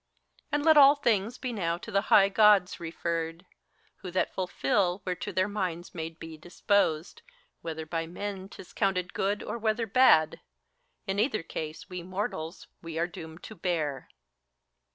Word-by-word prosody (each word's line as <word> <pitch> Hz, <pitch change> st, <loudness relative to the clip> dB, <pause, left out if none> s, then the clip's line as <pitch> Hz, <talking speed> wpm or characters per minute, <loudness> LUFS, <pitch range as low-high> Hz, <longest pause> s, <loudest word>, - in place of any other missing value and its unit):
And 295 Hz, +1 st, 0 dB
let 315 Hz, -1 st, +7 dB
all 280 Hz, 0 st, +9 dB
things 230 Hz, -4 st, 0 dB
be 255 Hz, -2 st, -4 dB
now 170 Hz, -5 st, -1 dB
to -, -, -9 dB
the 195 Hz, -, +2 dB
high 195 Hz, -1 st, +7 dB
Gods 200 Hz, -2 st, +4 dB
referred. 165 Hz, +1 st, -3 dB, 0.5 s
Who 185 Hz, -, -8 dB
that 185 Hz, +1 st, -1 dB
fulfil, 180 Hz, +1 st, 0 dB
whereto 180 Hz, -2 st, -3 dB
their 185 Hz, +2 st, +1 dB
minds 180 Hz, -4 st, -4 dB
may 160 Hz, -2 st, -4 dB
be 165 Hz, -1 st, -10 dB
disposed, 175 Hz, -1 st, 0 dB, 0.4 s
Whether 160 Hz, -1 st, -5 dB
by 165 Hz, 0 st, -3 dB
men 195 Hz, +2 st, -6 dB
't -, -, -14 dB
is 180 Hz, -, -12 dB
counted 185 Hz, -2 st, 0 dB
good, 205 Hz, +2 st, -1 dB
or 235 Hz, -, -4 dB
whether 220 Hz, +1 st, 0 dB
bad; 210 Hz, -9 st, +4 dB, 0.7 s
In 195 Hz, 0 st, -2 dB
either 215 Hz, -5 st, +1 dB
case 155 Hz, -1 st, -6 dB
we 180 Hz, -1 st, -6 dB
mortals, 185 Hz, -2 st, -4 dB, 0.2 s
we 165 Hz, -1 st, -7 dB
are 170 Hz, -, +2 dB
doomed 165 Hz, -1 st, -10 dB
to -, -, -8 dB
bear. 165 Hz, -7 st, -2 dB
185 Hz, 160 wpm, -28 LUFS, 165-205 Hz, 0.7 s, all